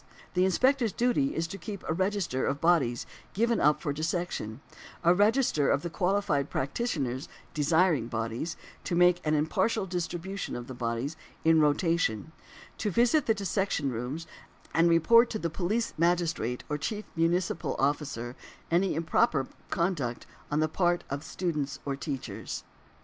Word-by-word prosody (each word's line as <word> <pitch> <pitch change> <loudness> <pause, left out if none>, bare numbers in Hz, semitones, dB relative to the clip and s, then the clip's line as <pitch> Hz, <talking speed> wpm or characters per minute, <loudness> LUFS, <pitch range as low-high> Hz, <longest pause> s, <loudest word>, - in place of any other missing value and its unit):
The 180 0 +3
Inspector's 240 +3 +2
duty 250 +3 +1
is 165 - 0
to 195 +4 -7
keep 205 -3 -7
a - - +1
register 185 -6 0
of 140 +1 0
bodies 150 -8 +2 0.3
given 230 +3 +2
up 150 +1 +4
for 145 - -1
dissection; 155 - -3 0.4
a 170 - +6
register 205 - +3
of 140 - +2
the 170 - -4
qualified 180 -7 +1
practitioners 135 - -2 0.2
desiring 155 -3 +3
bodies; 115 +7 -3 0.3
to 175 - -1
make 180 0 +5
an 155 0 +2
impartial 190 +8 +1
distribution 180 +2 -4
of 120 - -5
the 130 - -8
bodies 120 +4 -2 0.3
in 160 -1 +6
rotation; 155 - +1 0.5
to 210 - 0
visit 240 - +3
the 225 - +4
dissection 190 -7 -1
rooms, 125 +8 -4 0.5
and 165 - +4
to - - +5
report 230 +9 +6
to 220 - -2
the 170 -6 -3
police 205 +7 -1
magistrate 165 -8 +1
or 150 0 -2
chief 210 +8 -3
municipal 170 +2 0
officer, 135 -4 -1 0.4
any 180 +1 +2
improper 160 -3 +2 0.2
conduct 150 -9 -1 0.2
on 150 +1 +1
the 155 - +3
part 175 +2 +1
of 140 +2 -3
students 155 -5 -2
or 140 -1 -1
teachers. 140 -2 -5
165 Hz, 150 wpm, -29 LUFS, 140-190 Hz, 0.5 s, a